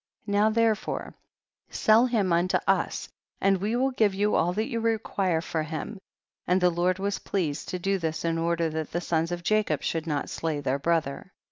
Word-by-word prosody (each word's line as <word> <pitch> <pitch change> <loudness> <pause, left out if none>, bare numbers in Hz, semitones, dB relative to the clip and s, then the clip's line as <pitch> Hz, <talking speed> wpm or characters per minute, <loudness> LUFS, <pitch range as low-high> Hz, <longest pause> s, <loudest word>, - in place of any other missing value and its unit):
Now 205 +1 +3
therefore 225 -1 0 0.6
sell 225 +3 +4
him 210 -7 +1
unto 175 +2 +2
us, - - 0 0.3
and 195 0 +3
we 215 +4 0
will 265 +2 +1
give 215 -6 +2
you 205 +2 +1
all 175 - +2
that 215 +3 0
you 230 - -2
require 205 -6 0
for 165 -1 -2
him; 160 +7 -5 0.5
and 180 +1 +3
the 180 -1 +3
Lord 175 +2 +1
was 200 +1 -2
pleased 160 -7 -2
to 180 - -2
do 195 +2 0
this 160 -1 -3
in 165 0 0
order 170 0 +1
that 160 -1 -4
the 175 - 0
sons 165 -1 -1
of 175 0 -4
Ja 215 0 +4
cob 155 -8 -2
should 165 0 -2
not 145 -3 -1
slay 160 -3 -2
their 140 -1 -1
brother. 165 +2 -1
180 Hz, 200 wpm, -27 LUFS, 165-210 Hz, 0.6 s, sell